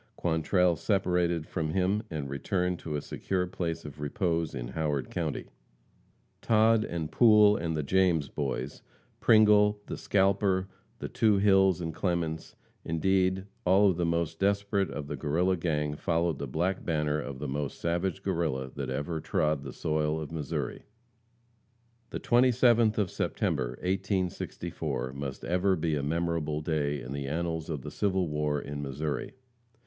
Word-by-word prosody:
Quantrell 85 +2 +2
separated 90 -3 +1
from 80 -3 -3
him, 95 +3 +1
and 75 -4 -4
returned 90 +6 -1
to 75 -2 -5
a 75 - -2
secure 95 -2 -2
place 85 -3 -4
of 75 -1 -9
repose 80 +1 -1
in - - -5
Howard 75 -1 -2
county. - - -3 1.0
Todd 110 0 +4
and 80 -5 -4
Poole 105 -3 +6
and 80 -3 -2
the 75 - -1
James 85 -2 +2
boys, 65 +1 -4 0.4
Pringle, 105 -2 +5
the - - -5
scalper, 95 -1 +2 0.3
the - - -5
two 105 -3 +2
Hills 95 -2 +4
and 80 -1 -3
Clements, 85 -3 -2 0.3
indeed, 95 +3 +1 0.2
all 95 +2 +5
of 85 - -4
the 90 - 0
most 85 -1 -1
desperate 100 0 +1
of 75 - -5
the 75 - -4
Guerrilla 85 +7 +1
gang 75 -4 -1
followed 85 -1 0
the 70 - -3
black 85 +8 -1
banner 75 -2 0
of 70 -2 -6
the 75 +2 -4
most 70 0 -3
savage 85 +3 -1
Guerrilla 80 -8 -1
that - - -4
ever 80 +3 -2
trod 75 -2 0
the - - -7
soil 75 0 -1
of 75 -1 -6
Missouri. 75 -4 -4 1.2
The - - -4
27th 120 -2 +4
of 100 -5 0
September, 60 -1 -1
1864, 95 -8 -2
must 70 -1 -6
ever 90 +2 +2
be 80 -1 -1
a 75 - 0
memorable 80 0 -1
day 75 -2 -1
in 65 0 -7
the 70 -1 -4
annals 80 +1 -2
of 75 -5 -4
the - - -6
civil 95 -3 0
war 75 -1 -1
in 70 0 -6
Missouri. 70 - -4
85 Hz, 155 wpm, -29 LUFS, 75-95 Hz, 1.2 s, Poole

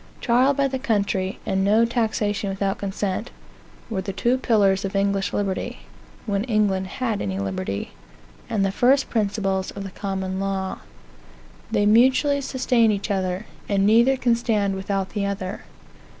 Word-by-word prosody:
Trial 255 +3 +3
by 280 0 +2
the 265 -1 -3
country, 200 -5 0
and 190 0 0
no 215 +4 +4
taxation 215 -3 -1
without 195 0 -2
consent, 200 +2 -3 0.6
were 210 -5 -2
the 195 +1 -4
two 240 +6 +1
pillars 200 -6 +3
of 195 0 -4
English 200 0 +1
liberty, 195 -2 -2 0.4
(when 200 -2 0
England 205 -5 +1
had 225 +1 -2
any 95 -2 -2
liberty,) 95 0 -3 0.6
and 195 -2 +1
the 195 - 0
first 265 +6 +3
principles 200 -3 0
of 200 - -7
the 195 - -7
Common 190 -1 -3
Law. 195 -1 -2 0.9
They 205 - +1
mutually 260 +6 +4
sustain 250 -4 +2
each 205 0 -2
other; 185 +1 -1 0.2
and 200 -1 +2
neither 235 +5 +5
can 245 -2 +2
stand 215 -4 0
without 190 0 -2
the 200 -1 -1
other. 195 0 -4
200 Hz, 150 wpm, -23 LUFS, 195-230 Hz, 0.9 s, neither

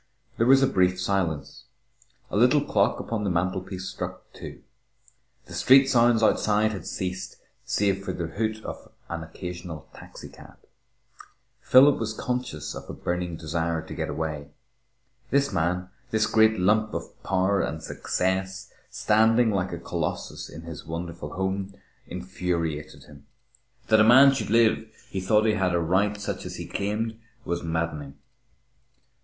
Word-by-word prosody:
There 115 - +2
was 135 +1 +6
a - - +5
brief 90 -3 +2
silence. 90 -7 -2 0.7
A - - -3
little 125 +7 +4
clock - - +2
upon 115 -2 -3
the 100 - 0
mantelpiece 95 +2 -2
struck - - -6
two. - - -10 0.8
The - - -12
street 135 +1 +6
sounds 120 -2 +4
outside 110 0 +3
had 100 - -6
ceased 95 0 -4 0.3
save 100 -1 0
for 95 - -3
the 85 -2 -3
hoot 110 +5 -3
of - - -8 0.2
an 85 -1 -4
occasional 85 -1 -7
taxicab. - - -13 1.0
Philip 135 +3 +6
was 110 -1 -2
conscious 125 -14 -3
of - - -9
a - - -5
burning 90 -1 -3
desire 80 0 -2
to - - -9
get - - -3
away. 75 -1 -4 0.8
This 140 -4 +2
man, 90 +1 0 0.2
this 110 0 +2
great 110 -1 +4
lump 105 +3 +2
of - - -7
power 95 +1 +1
and 80 0 -3
success, 95 +1 -2 0.2
standing 110 +2 +3
like 95 -2 -1
a 85 - -4
colossus 85 - -4
in 80 - -10
his 85 -2 -8
wonderful 85 -2 -6
home, 95 +1 -2 0.3
infuriated 85 -4 -3
him. 70 -1 -16 0.6
That 110 -1 +6
a - - +7
man 135 +5 +8
should 135 - -3
live 115 0 +4 0.3
who 95 - -3
thought 105 +3 +3
he 110 - +3
had 95 -3 +1
a - - +2
right 95 +5 +1
such 100 - -4
as - - -7
he - - -6
claimed, 110 +3 -3 0.3
was 85 0 -2
maddening. 80 -4 -3
95 Hz, 150 wpm, -26 LUFS, 85-110 Hz, 1.0 s, man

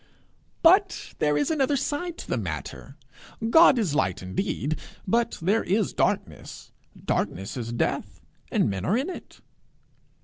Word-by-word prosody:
'But 375 +3 +4
there 150 -1 +2
is 145 - +1
another 285 -2 +1
side 325 +6 -3
to - - -9
the - - -1
matter: - - -6 0.5
God 325 -3 +7
is 200 -10 0
light 95 -10 0
indeed, 150 - -2 0.3
but 235 +4 +1
there 195 +7 +1
is 200 +2 0
darkness; - - -2 0.3
darkness 95 +3 -2
is 120 -2 -4
death, 120 - -2 0.3
and - - +2
men 95 -2 -3
are 200 - +2
in 280 +9 -2
it.' - - -11
205 Hz, 140 wpm, -26 LUFS, -, 0.5 s, God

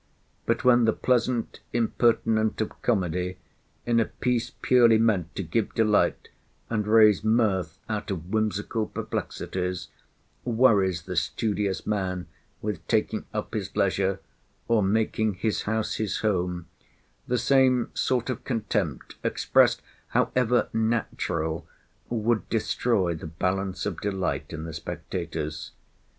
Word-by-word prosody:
But - - +1
when 120 -2 +5
the 110 - +3
pleasant 125 -1 0
impertinent 115 -1 +2
of 110 - -3
comedy, 90 -4 0 0.5
in 120 -1 +3
a 115 - +3
piece 125 -1 -1
purely 120 -3 +6
meant 105 -7 +1
to 95 - -2
give 100 +6 -1
delight, 110 -2 +2 0.4
and 105 -2 0
raise 110 -2 +6
mirth 100 -7 +1
out 105 -1 -3
of 90 -2 -4
whimsical 110 0 0
perplexities, 90 -4 -4 0.5
worries 105 -8 +3
the 90 +1 -5
studious 100 +2 -1
man 95 -4 -1 0.4
with 105 -6 -4
taking 110 -1 0
up 105 0 -4
his 105 -2 -4
leisure, 95 0 +1 0.5
or 115 -2 +3
making 110 +1 +1
his 105 +4 -1
house 110 0 -1
his 105 -3 -2
home, 90 -5 0 0.6
the 125 - +1
same 130 0 +3
sort 130 0 0
of - - -6
contempt 105 - -2
expressed - - +3 0.2
(however 125 -1 +2
natural) 85 -8 -1 0.4
would 115 -1 0
destroy 110 -4 +1
the 80 0 -7
balance 90 +4 -2
of 100 -5 -3
delight 95 -2 -2
in 80 -1 -5
the 80 0 -6
spectators. 80 -1 -5
105 Hz, 125 wpm, -26 LUFS, 90-115 Hz, 0.6 s, purely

